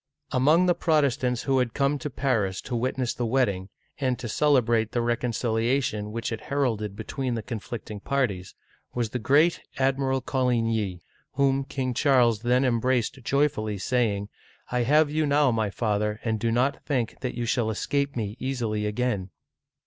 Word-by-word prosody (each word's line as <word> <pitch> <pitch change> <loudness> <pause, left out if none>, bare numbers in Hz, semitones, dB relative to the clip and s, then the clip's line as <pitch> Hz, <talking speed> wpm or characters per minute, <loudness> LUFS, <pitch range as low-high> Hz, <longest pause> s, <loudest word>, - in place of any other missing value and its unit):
" - - -43
Among 155 +8 +4
the 180 - +4
Protestants 140 -7 +1
who 135 -1 +2
had 125 -2 -1
come 140 +1 +1
to 150 - -4
Paris 115 -8 0
to 125 - -4
wit 125 +3 -1
ness 125 -2 0
the 120 - -3
wedding, 100 -7 0 0.3
and 130 -3 0
to 120 - -6
celebrate 120 -4 +2
the 120 - +1
reconciliation 115 -1 0
which 115 +2 -3
it 110 - -4
heralded 115 -8 -1
between 120 +3 -3
the 115 - -4
conflicting 110 -1 -6
parties, 105 -7 -2 0.4
was 120 -3 -1
the 125 - -2
great 150 +9 +3 0.2
Admiral 135 0 +1
Co 130 +1 -1
ligny, 115 -6 0 0.3
whom 135 0 +2
King 130 -2 -3
Charles 120 -5 +3
then 125 +2 +2
embraced 125 +1 0
joyfully, 120 -6 0
saying, 105 -3 0 0.2
" - - -26
I 125 0 +1
have 145 +4 +3
you 155 0 +1
now, 145 -1 +4
my 110 -2 0
father, 105 0 -1
and 110 -2 -1
do 115 +2 0
not 130 +4 +1
think 125 -6 -2
that 125 - -4
you 120 - -2
shall 115 -1 +1
escape 140 +6 -1
me 105 -3 -3
easily 115 -5 -2
again 105 -3 -1
125 Hz, 170 wpm, -26 LUFS, 110-135 Hz, 0.4 s, Among